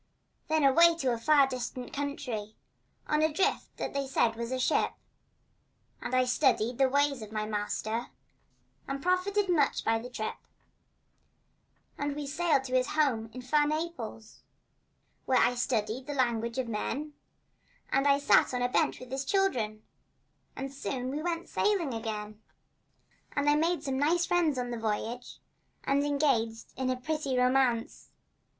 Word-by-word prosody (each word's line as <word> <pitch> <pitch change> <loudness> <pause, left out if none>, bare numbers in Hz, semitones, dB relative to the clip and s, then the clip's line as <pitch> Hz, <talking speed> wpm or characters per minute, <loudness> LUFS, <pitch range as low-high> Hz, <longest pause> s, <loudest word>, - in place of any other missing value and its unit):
Then 315 -1 +2
away 335 +5 +6
to 265 -7 0
a 230 - -3
far 285 +3 +5
distant 250 -1 -5
country 265 -7 -4 0.5
On 300 0 +2
a 315 0 +3
drift 325 +6 -1
that - - -4
they 280 -1 -2
said 235 -4 +2
was 235 +1 -4
a 260 - 0
ship, 255 - +1 1.1
And 255 - -2
I 255 0 +4
studied 250 -2 +1
the 265 -1 +4
ways 285 -1 +1
of 215 -1 -8
my 215 -1 -2
master 215 +2 -2 0.8
And 275 0 -4
profited 380 +3 +1
much 310 -6 +2
by 225 0 +2
the 245 +2 -8
trip. 220 -3 -4 1.6
And 285 0 -2
we 295 -1 -4
sailed 305 -1 +1
to 255 -1 -6
his 255 0 +3
home 255 -8 +1
in 255 +1 -8
fair 295 +4 +2
Naples, 300 -9 -5 0.8
Where 260 - +3
I 245 - +4
studied 240 0 -1
the 290 - -4
language 235 -2 0
of 260 -2 -1
men, 280 +7 -3 0.8
And 275 +1 +2
I 280 0 +5
sat 285 -2 +4
on 245 - 0
a 245 - +1
bench - - +1
with 255 -1 -11
his 270 +1 -2
children, 245 - 0 0.7
But 270 0 -5
soon 255 0 -4
we 295 +2 -3
went 340 0 -3
sailing 375 - 0
again. 215 -1 -5 0.9
And 285 0 0
I 295 - +6
made 320 +1 +1
some 265 -3 -2
nice 340 +4 +2
friends 335 -6 +2
on 245 -1 -2
the 235 - -4
voyage, 225 +3 -3 0.5
And 280 +1 +2
engaged 270 -6 0
in 260 0 -1
a 255 - +1
pretty 285 -1 -2
romance. 250 -2 +1
265 Hz, 160 wpm, -30 LUFS, 235-295 Hz, 1.6 s, away